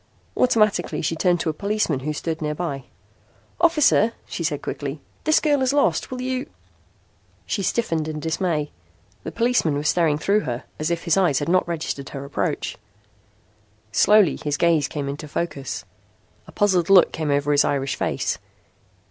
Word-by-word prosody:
Automatically 215 -7 +2
she 160 +2 0
turned 175 +1 +2
to - - -1
a - - -11
policeman 200 -5 -1
who 150 +3 -3
stood 160 +2 -4
nearby. 150 -3 -3 0.7
"Officer," 300 -9 +4
she 170 - -5
said 150 -3 -2
quickly, 145 +1 -4 0.3
"this 310 +1 +4
girl 290 -3 +2
is 260 +1 +2
lost. 290 - +1
Will 255 - -5
you...?" 255 +1 -2 1.0
She 205 - -2
stiffened 165 -6 0
in 155 -1 -4
dismay. 160 -1 -1 0.5
The - - -5
policeman 230 -10 +1
was 150 +1 -2
staring 160 -4 +2
through 200 +7 +2
her 125 - -4 0.2
as 155 +1 -1
if 170 -1 -2
his 170 -1 +2
eyes 175 -8 +3
had 145 - -1
not 185 0 +3
registered 155 -4 -4
her 140 -1 -7
approach. 140 - -2 1.1
Slowly 205 - +4
his 145 -1 -1
gaze 165 -5 +3
came 145 0 -4
into 145 +2 -5
focus. 140 - -4 0.6
A - - -12
puzzled 190 -4 +2
look 195 -2 +7
came 155 -2 -3
over 145 +1 +1
his 145 0 +4
Irish 135 -1 -1
face. - - -2
165 Hz, 165 wpm, -23 LUFS, 145-205 Hz, 1.1 s, look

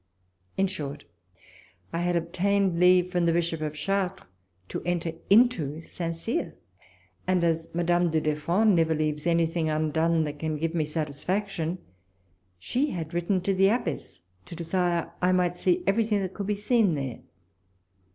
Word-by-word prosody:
In 195 - +3
short, 145 -6 -5 0.9
I 165 - -1
had 175 0 0
ob 170 0 -2
tained 195 -1 +1
leave 180 0 +5
from 175 -2 +1
the - - +4
Bishop 165 -1 0
of 155 -1 -3
Chartres 190 +4 -1 0.4
to - - -4
enter 175 -1 -1 0.2
into 195 - +4
St. 165 0 -5
Cyr; 225 - -3 0.7
and, 185 -1 +2
as 165 -1 0
Madame 175 0 +2
du 160 0 +1
Deffand 170 +8 +2
never 160 -1 +2
leaves 150 +1 -1
anything 165 -1 +1
undone 160 +1 +1
that 150 -1 -5
can 155 -1 -2
give 165 +2 -2
me 160 -3 +1
satisfaction, 165 +4 -2 0.8
she 255 - -1
had 165 - -5
written 175 +2 0
to 195 +2 0
the 195 +1 +4
abbess 205 - -2 0.3
to - - -8
desire 170 0 -1
I 180 0 +3
might 180 -1 +2
see 180 0 +1
everything 210 +1 +2
that 190 -1 -4
could 200 -2 -5
be 210 - +1
seen 210 -3 +2
there. 135 -4 -4
170 Hz, 160 wpm, -27 LUFS, 160-190 Hz, 0.9 s, leave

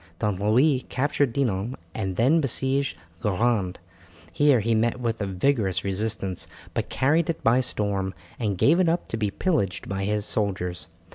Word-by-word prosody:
Don 105 -3 -1
Louis 125 +6 +3
captured 140 0 +1
Dinan 115 -2 -1 0.2
and 95 -4 -3
then 140 - +4
besieged 135 0 0 0.2
Guerande. 105 -2 +1 0.6
Here 145 -4 +4
he 115 +2 +1
met 115 +3 +1
with 115 -2 -2
a 100 - -1
vigorous 95 0 0
resistance, 100 -1 -2 0.3
but - - -2
carried 155 +6 +2
it 165 - -2
by 120 +3 +4
storm, 100 -5 -2 0.2
and 105 -5 -1
gave 160 - +4
it 180 -3 +4
up 170 +2 -1
to 115 - -2
be 105 -2 0
pillaged 100 - -1
by 95 0 -2
his 105 0 0
soldiers. 95 -5 -2
110 Hz, 160 wpm, -25 LUFS, 100-135 Hz, 0.6 s, then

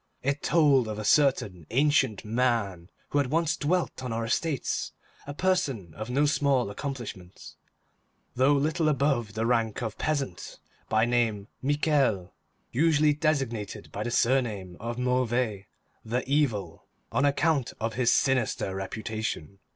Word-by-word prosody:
It 140 +2 0
told 145 -7 +4
of 105 -1 -4
a 105 - -4
certain 105 - +2
ancient 130 -5 +2
man 110 -6 0 0.2
who 145 - +1
had 140 - +1
once 160 +1 +1
dwelt 170 -1 -1
on 125 - -4
our 115 0 -2
estates, 140 +4 -1 0.3
a 145 - -5
person 140 - 0
of 110 +6 -6
no 140 +4 +2
small 140 -6 +2
accomplishments, 110 -8 -7 0.8
though 130 +3 +4
little 155 +3 +1
above 135 -7 0
the 110 +1 0
rank 115 -1 0
of 110 -2 -5
peasant; 140 - -3 0.3
by 110 +1 +3
name, 115 -3 0
Michel, 140 - +1 0.4
usually 150 +1 +3
designated 135 - -2
by - - -5
the - - -2
surname 115 -7 0
of 115 +2 -4
Mauvais, 125 -5 0 0.4
the 120 +3 -2
Evil, 115 - 0 0.2
on - - +1
account 145 -1 +2
of 115 0 -2
his 125 +1 +2
sinister 125 -7 +1
reputation. 100 -2 -4
125 Hz, 135 wpm, -27 LUFS, 110-145 Hz, 0.8 s, told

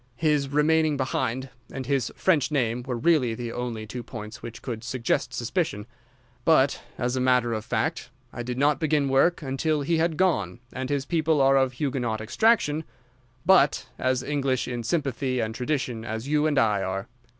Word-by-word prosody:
His 150 -4 +1
remaining 155 +1 +3
behind 130 -1 -2 0.2
and 130 -1 -5
his 135 -3 0
French 165 -7 +2
name 125 -5 0
were 125 -1 -4
really 125 -4 +2
the 120 0 -5
only 115 -3 -4
two 120 +3 -6
points 110 -3 -8
which 115 -1 -9
could 115 -3 -5
suggest 125 -1 -1
suspicion; 120 - -2 0.6
but, 140 -4 +3 0.2
as 125 +1 -1
a 130 - 0
matter 125 -2 +3
of 110 -1 -3
fact, 160 +2 -2 0.2
I 120 - -5
did 125 +1 -4
not 145 +2 +3
begin 150 -3 +1
work 150 +6 +3
until 145 +3 0
he 165 +3 +1
had 160 -1 +1
gone, 120 - +1
and 130 0 -4
his 140 -1 -1
people 160 -1 +1
are 135 0 +5
of 130 -1 +2
Huguenot 125 -5 -2
extraction, 155 - +2 0.6
but 180 -7 +4
as 130 -1 +1
English 135 -4 0
in 120 -1 -3
sympathy 130 -2 -1
and 110 -1 -1
tradition 125 -3 -2
as 110 +2 -5
you 150 +1 +2
and 150 -2 0
I 105 -5 +3
are. 95 +1 -3
130 Hz, 175 wpm, -26 LUFS, 120-150 Hz, 0.6 s, are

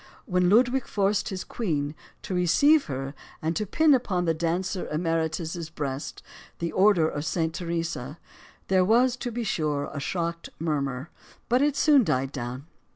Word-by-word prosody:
When 180 -6 +2
Ludwig 245 +5 +3
forced 200 0 +1
his 185 -1 -4
queen 150 -10 -2 0.3
to - - -4
receive 280 - +4
her 135 -1 -4 0.3
and 160 +2 -2
to 215 - -1
pin 315 +7 +4
upon 195 -9 +1
the 165 - +2
dancer 175 +3 -2
emeritus' 165 0 -2
breast 145 -3 -5 0.3
the 170 0 -3
Order 190 -5 +4
of 145 -2 -3
St. 160 0 -1
Theresa, 165 -5 -3 0.5
there 190 -1 +4
was, 240 +5 +4
to 245 -1 -4
be 235 +1 -3
sure, 150 -8 -1
a 145 - -4
shocked 170 +2 -3
murmur. 140 -3 -2 0.4
But 250 +2 +3
it 290 -1 +2
soon 290 -3 +5
died 135 -7 0
down. 125 0 -5
170 Hz, 155 wpm, -26 LUFS, 155-210 Hz, 0.5 s, soon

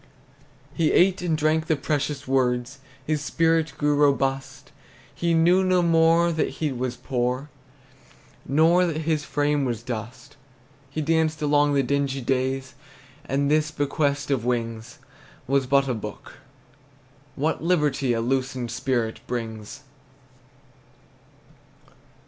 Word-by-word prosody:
He 160 -2 +1
ate 185 +1 +3
and 165 -3 0
drank 155 +1 +1
the 160 - +2
precious 145 -1 -2
words, 130 0 0 0.3
His 150 0 -1
spirit 165 +1 +1
grew 145 0 +1
robust; 135 -1 0 0.4
He 170 -1 0
knew 175 +3 +4
no 185 -1 +2
more 165 0 +4
that 160 -2 0
he 155 -3 -1
was 125 -1 -3
poor, 125 +2 -2 0.9
Nor 165 +5 +3
that 160 -1 -2
his 155 -1 0
frame 145 -1 0
was 120 -3 -3
dust. 120 +2 -7 0.5
He 155 +3 -3
danced 160 0 +1
along 145 0 +3
the 140 - +3
dingy 140 +1 -1
days, 130 +1 -1 0.5
And 140 +2 0
this 155 0 +2
bequest 145 -1 -1
of 130 -5 0
wings 115 +1 -3 0.5
Was 135 -1 +1
but 140 +1 +3
a 130 - 0
book. 105 -2 -8 1.0
What 155 +3 -1
liberty 150 -6 +1
A 115 - -1
loosened 130 -1 -2
spirit 120 -2 -1
brings! 110 -3 -5
140 Hz, 125 wpm, -24 LUFS, 130-155 Hz, 1.0 s, knew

